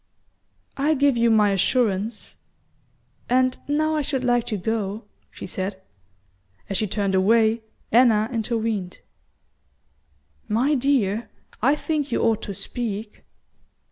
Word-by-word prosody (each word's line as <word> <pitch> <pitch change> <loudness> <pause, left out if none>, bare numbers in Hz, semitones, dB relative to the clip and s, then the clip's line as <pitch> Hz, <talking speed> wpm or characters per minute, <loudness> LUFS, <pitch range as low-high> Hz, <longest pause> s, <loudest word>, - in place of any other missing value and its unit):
"I 295 +3 +2
give 280 -1 +3
you 235 0 +3
my 210 -2 +4
assurance; 210 +1 0 0.9
and 255 +1 +3
now 310 +2 +1
I 305 - +1
should 270 -2 -2
like 245 -1 +2
to 215 - -2
go," 210 +1 -2 0.3
she - - -9
said. 190 0 -4 0.9
As 195 - 0
she 215 - 0
turned 200 -1 -1
away, 220 +4 +3 0.3
Anna 225 -2 +5
intervened. 220 -4 -2 1.5
"My 250 +8 +2
dear, 240 -6 +1 0.3
I 270 +6 +4
think 300 -3 -2
you - - +1
ought 225 -2 +2
to 200 - -5
speak." 215 -2 -5
225 Hz, 120 wpm, -23 LUFS, 210-255 Hz, 1.5 s, Anna